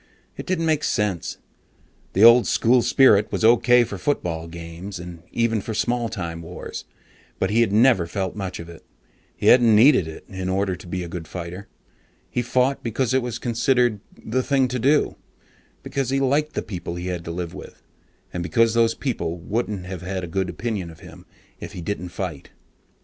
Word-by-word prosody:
It -, -, -8 dB
didn't 180 Hz, -3 st, 0 dB
make 155 Hz, -2 st, +1 dB
sense. 105 Hz, -6 st, -1 dB, 0.8 s
The 100 Hz, -, +3 dB
old 115 Hz, +1 st, +8 dB
school 120 Hz, +2 st, +3 dB
spirit 110 Hz, -5 st, +4 dB
was -, -, 0 dB
okay 120 Hz, +1 st, +5 dB
for 100 Hz, -4 st, -6 dB
football 85 Hz, -, -2 dB
games, 85 Hz, +3 st, -8 dB
and 85 Hz, -1 st, -9 dB
even 115 Hz, -2 st, +1 dB
for 110 Hz, +2 st, -5 dB
small 120 Hz, +1 st, 0 dB
time 85 Hz, -4 st, -5 dB
wars, 85 Hz, +2 st, -8 dB, 0.5 s
but 95 Hz, -, 0 dB
he 115 Hz, +2 st, +3 dB
had 115 Hz, -4 st, +2 dB
never 110 Hz, -5 st, +4 dB
felt 95 Hz, +1 st, -3 dB
much 95 Hz, -3 st, -5 dB
of 85 Hz, -, -8 dB
it. 85 Hz, -1 st, -12 dB, 0.5 s
He -, -, -5 dB
hadn't 120 Hz, -3 st, +6 dB
needed 110 Hz, -, +6 dB
it 80 Hz, -, -9 dB
in 95 Hz, -1 st, -5 dB
order 95 Hz, 0 st, 0 dB
to 90 Hz, -, -13 dB
be 90 Hz, +1 st, -3 dB
a -, -, -6 dB
good 85 Hz, -1 st, -7 dB
fighter. 90 Hz, +3 st, -7 dB, 0.6 s
He 125 Hz, -, 0 dB
fought 125 Hz, +3 st, +1 dB
because 120 Hz, +2 st, -1 dB
it 130 Hz, -, +3 dB
was 120 Hz, -1 st, -4 dB
considered 120 Hz, -1 st, +1 dB, 0.2 s
the 125 Hz, +4 st, -1 dB
"thing 135 Hz, -1 st, +2 dB
to 125 Hz, 0 st, -2 dB
do," 140 Hz, +5 st, +2 dB, 0.7 s
because 135 Hz, -3 st, -2 dB
he 135 Hz, +1 st, +1 dB
liked 145 Hz, +3 st, +1 dB
the -, -, -1 dB
people 90 Hz, -4 st, -6 dB
he 90 Hz, +1 st, -5 dB
had 90 Hz, -2 st, -3 dB
to -, -, -6 dB
live 85 Hz, 0 st, -5 dB
with, -, -, -11 dB, 0.5 s
and 90 Hz, -, -3 dB
because 110 Hz, +7 st, +2 dB
those 115 Hz, -1 st, +3 dB
people 110 Hz, -11 st, -3 dB
wouldn't 100 Hz, +1 st, -3 dB
have 90 Hz, -1 st, -6 dB
a 95 Hz, 0 st, -4 dB
good 95 Hz, +2 st, -2 dB
opinion 100 Hz, -1 st, -3 dB
of 80 Hz, -1 st, -14 dB
him -, -, -13 dB, 0.3 s
if -, -, -8 dB
he 90 Hz, -, -7 dB
didn't 90 Hz, -1 st, -4 dB
fight. 85 Hz, -5 st, -6 dB
105 Hz, 190 wpm, -23 LUFS, 90-120 Hz, 0.8 s, old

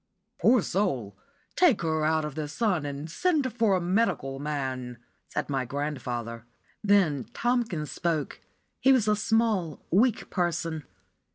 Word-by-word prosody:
"Poor 235 Hz, -4 st, +5 dB
soul! 135 Hz, -, -1 dB, 0.4 s
Take 315 Hz, -, +4 dB
her 160 Hz, -1 st, 0 dB
out 155 Hz, 0 st, +2 dB
of 150 Hz, -, -5 dB
the 155 Hz, 0 st, -3 dB
sun 170 Hz, -1 st, 0 dB
and 140 Hz, +2 st, -5 dB
send 290 Hz, -, 0 dB
for 225 Hz, -5 st, +3 dB
a -, -, +2 dB
medical 175 Hz, -8 st, 0 dB
man," 130 Hz, -4 st, -3 dB, 0.3 s
said -, -, -2 dB
my 135 Hz, -2 st, -1 dB
grandfather. 125 Hz, -4 st, -4 dB, 0.4 s
Then 185 Hz, -, +3 dB
Tomkins 230 Hz, -11 st, 0 dB
spoke. 160 Hz, -5 st, -2 dB, 0.4 s
He 265 Hz, +2 st, +5 dB
was 250 Hz, -5 st, +4 dB
a 210 Hz, -, +4 dB
small, 215 Hz, -6 st, 0 dB
weak 225 Hz, +5 st, +2 dB
person. 170 Hz, -4 st, -1 dB
165 Hz, 135 wpm, -27 LUFS, 145-215 Hz, 0.4 s, Poor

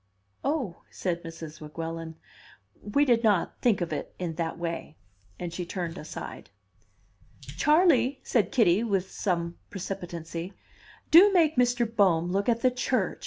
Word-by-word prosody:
"Oh," 270 Hz, -, -2 dB
said 175 Hz, -2 st, -3 dB
Mrs. 165 Hz, -2 st, -9 dB
Weguelin, 165 Hz, +1 st, -6 dB, 0.7 s
"we 280 Hz, +9 st, +2 dB
did 240 Hz, -3 st, +3 dB
not 205 Hz, -6 st, +1 dB
think 225 Hz, -6 st, +2 dB
of 170 Hz, -, -2 dB
it -, -, -5 dB
in 175 Hz, -3 st, -3 dB
that 165 Hz, 0 st, -3 dB
way." 170 Hz, -2 st, -5 dB, 0.4 s
And 175 Hz, -1 st, -5 dB
she 180 Hz, -, -3 dB
turned 175 Hz, -1 st, -4 dB
aside. -, -, -8 dB, 0.9 s
"Charley," 300 Hz, -5 st, +3 dB
said 215 Hz, -7 st, +1 dB
Kitty, 210 Hz, -4 st, +4 dB
with 195 Hz, -4 st, -1 dB
some 170 Hz, -3 st, -2 dB
precipitancy, 175 Hz, -2 st, -6 dB, 0.6 s
"do 370 Hz, +6 st, +9 dB
make 330 Hz, -5 st, +3 dB
Mr. 245 Hz, -1 st, +3 dB
Bohm 185 Hz, -6 st, +2 dB
look 200 Hz, +4 st, 0 dB
at 235 Hz, 0 st, +1 dB
the 255 Hz, -, +4 dB
church!" 250 Hz, -5 st, -1 dB
190 Hz, 140 wpm, -27 LUFS, 170-245 Hz, 0.9 s, do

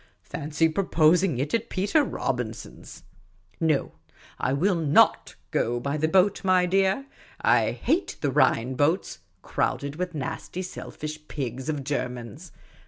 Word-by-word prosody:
Fancy 155 Hz, +2 st, 0 dB
proposing 165 Hz, -1 st, +3 dB
it 140 Hz, +4 st, -2 dB
at 230 Hz, 0 st, 0 dB
Peter 205 Hz, +11 st, +2 dB
Robin 125 Hz, -, -2 dB
son's! -, -, -12 dB, 0.6 s
No, 155 Hz, -4 st, +1 dB, 0.5 s
I -, -, 0 dB
will 175 Hz, +9 st, +2 dB
not 160 Hz, -4 st, +3 dB, 0.2 s
go 120 Hz, +1 st, 0 dB
by 140 Hz, +4 st, -2 dB
the 155 Hz, +1 st, +1 dB
boat, 190 Hz, +4 st, +3 dB
my 185 Hz, -1 st, +4 dB
dear. 195 Hz, +7 st, +1 dB, 0.3 s
I -, -, +3 dB
hate 360 Hz, +4 st, -1 dB
the 145 Hz, -, 0 dB
Rhine 125 Hz, 0 st, +2 dB
boats, 150 Hz, +8 st, 0 dB, 0.2 s
crowded 140 Hz, +1 st, -2 dB
with 180 Hz, -1 st, -3 dB
nasty 155 Hz, +5 st, -4 dB
selfish 155 Hz, -3 st, -7 dB
pigs 130 Hz, 0 st, -4 dB
of 145 Hz, -3 st, -2 dB
Germans. 125 Hz, -5 st, -4 dB
155 Hz, 135 wpm, -26 LUFS, 135-185 Hz, 0.6 s, my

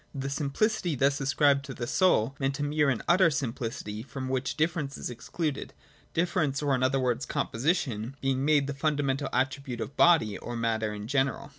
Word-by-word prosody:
The 135 Hz, 0 st, -3 dB
simplicity 160 Hz, +5 st, 0 dB
thus 140 Hz, +2 st, +1 dB
ascribed 140 Hz, +1 st, +3 dB
to 135 Hz, -, -7 dB
the 120 Hz, -, -4 dB
Soul 140 Hz, -, +2 dB
meant 135 Hz, 0 st, -1 dB
a -, -, 0 dB
mere 150 Hz, 0 st, +2 dB
and 130 Hz, -, -1 dB
utter 175 Hz, +1 st, +5 dB
simplicity, 115 Hz, -6 st, -4 dB
from 130 Hz, +1 st, -6 dB
which 130 Hz, 0 st, -2 dB
difference 155 Hz, -3 st, -1 dB
is -, -, -5 dB
excluded: 145 Hz, +5 st, -4 dB, 0.4 s
difference, 160 Hz, -5 st, +1 dB
or 145 Hz, -1 st, +2 dB
in 130 Hz, -, +1 dB
other 130 Hz, +1 st, +2 dB
words 125 Hz, -2 st, 0 dB
composition, 125 Hz, -, -1 dB
being 135 Hz, 0 st, 0 dB
made 145 Hz, -1 st, +3 dB
the 140 Hz, -, -3 dB
fundamental 140 Hz, -1 st, 0 dB
attribute 130 Hz, -1 st, -1 dB
of 140 Hz, -, -5 dB
body, 160 Hz, -, +4 dB
or 120 Hz, -, -6 dB
of 120 Hz, -, -3 dB
matter 110 Hz, -2 st, 0 dB
in 105 Hz, 0 st, -6 dB
general. 140 Hz, +1 st, 0 dB
135 Hz, 185 wpm, -28 LUFS, 125-150 Hz, 0.4 s, utter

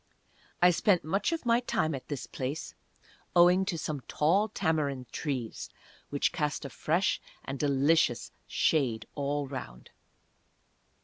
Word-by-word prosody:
I 180 Hz, -, +8 dB
spent 180 Hz, +1 st, +3 dB
much 195 Hz, -, 0 dB
of 330 Hz, -5 st, -3 dB
my 235 Hz, 0 st, +4 dB
time 160 Hz, -10 st, 0 dB
at 135 Hz, -, -6 dB
this 145 Hz, -3 st, -4 dB
place, 140 Hz, +4 st, -4 dB, 0.6 s
owing 180 Hz, +2 st, +6 dB
to 180 Hz, -3 st, -2 dB
some 150 Hz, -3 st, -3 dB
tall 185 Hz, +8 st, +2 dB
tamarind 150 Hz, -9 st, -1 dB
trees, 130 Hz, -7 st, -4 dB, 0.4 s
which 145 Hz, -, +1 dB
cast 150 Hz, -4 st, -1 dB
a 140 Hz, -, -6 dB
fresh 175 Hz, +4 st, +1 dB, 0.2 s
and 135 Hz, 0 st, -5 dB
delicious 140 Hz, -3 st, +2 dB, 0.2 s
shade 120 Hz, -8 st, +1 dB
all 145 Hz, 0 st, -1 dB
around. 130 Hz, -, -8 dB
150 Hz, 130 wpm, -30 LUFS, 135-175 Hz, 0.6 s, I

